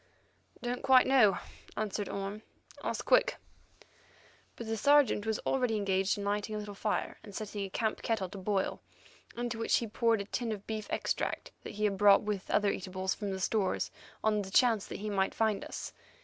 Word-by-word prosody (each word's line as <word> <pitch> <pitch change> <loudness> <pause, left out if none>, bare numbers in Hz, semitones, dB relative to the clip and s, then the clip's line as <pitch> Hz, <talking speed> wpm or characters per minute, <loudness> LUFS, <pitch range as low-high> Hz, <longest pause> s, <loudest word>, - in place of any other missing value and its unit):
"Don't 245 +1 -2
quite 260 -1 +6
know," 230 -8 +5 0.4
answered 210 -1 -2
Orme; 200 +2 -4 0.4
"ask - - -2
Quick." - - +4 1.2
But 235 - -7
the 225 0 -1
Sergeant 250 -2 +4
was 220 -1 +1
already 250 -4 +1
engaged 195 -1 +1
in 200 - -4
lighting 205 +1 -1
a - - -2
little 210 -1 -6
fire 210 +1 -2
and 205 -3 -11
setting 210 -1 -4
a 195 - -4
camp 220 +3 -1
kettle 220 -5 -1
to 195 - -8
boil, 195 0 -1 0.6
into 240 -1 -3
which 225 - +3
he 235 - -1
poured 225 0 +1
a - - -5
tin 230 +2 -2
of 205 -2 -5
beef 215 -1 -4
extract - - -2
that - - -8
he 210 - -3
had 200 -2 +1
brought 200 -1 +7
with 205 -2 -3
other 205 -1 +3
eatables 185 0 -2
from 205 -2 -4
our 190 - -3
stores 190 0 0 0.3
on 215 -1 +2
the 190 - -6
chance 225 0 +3
that - - -7
he 215 - -3
might 195 -1 0
find 220 -3 +1
us. - - -6
210 Hz, 190 wpm, -31 LUFS, 200-225 Hz, 1.2 s, brought